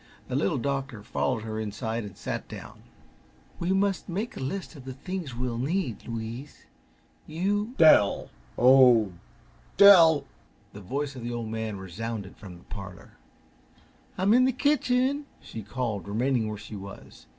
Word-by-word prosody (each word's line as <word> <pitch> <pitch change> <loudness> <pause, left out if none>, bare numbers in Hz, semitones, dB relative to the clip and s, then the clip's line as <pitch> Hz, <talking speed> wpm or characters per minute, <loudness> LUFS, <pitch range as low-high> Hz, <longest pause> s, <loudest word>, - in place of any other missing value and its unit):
The - - -2
Little 100 +8 +1
Doctor 135 -4 -3
followed 110 -1 -1
her 110 -1 -4
inside 110 +2 -3
and 100 -3 -10
sat - - -4
down. - - -10 0.8
"We 175 +2 -1
must 195 0 0
make 205 +7 -3
a - - -7
list 170 +7 -4
of 140 - -11
the 130 0 -7
things 175 -3 -5
we'll 120 -1 -3
need, 150 - -2
Louise. 115 +4 -7 0.6
You 205 +9 -1
" - - -25
"Dell! 155 -11 +5 0.3
Oh 125 -4 +6
h. - - -14 0.7
Dell!" 170 -7 +8 0.5
The 105 - -9
voice 140 +8 -3
of 125 - -8
the 120 +1 -4
Old 120 -2 -4
Man 110 -2 -3
resounded 100 +2 -6
from 95 -4 -11
the 90 - -18
parlor. 95 -2 -9 1.1
"I'm 195 +3 +3
in 250 +1 +6
the 260 - +3
kitchen!" 275 +1 +1 0.4
called 115 -5 -3
she, - - -9
remaining 115 +1 0
where 105 - -5
she 105 +1 -9
was. 95 -11 -11
125 Hz, 160 wpm, -27 LUFS, 110-180 Hz, 1.1 s, Dell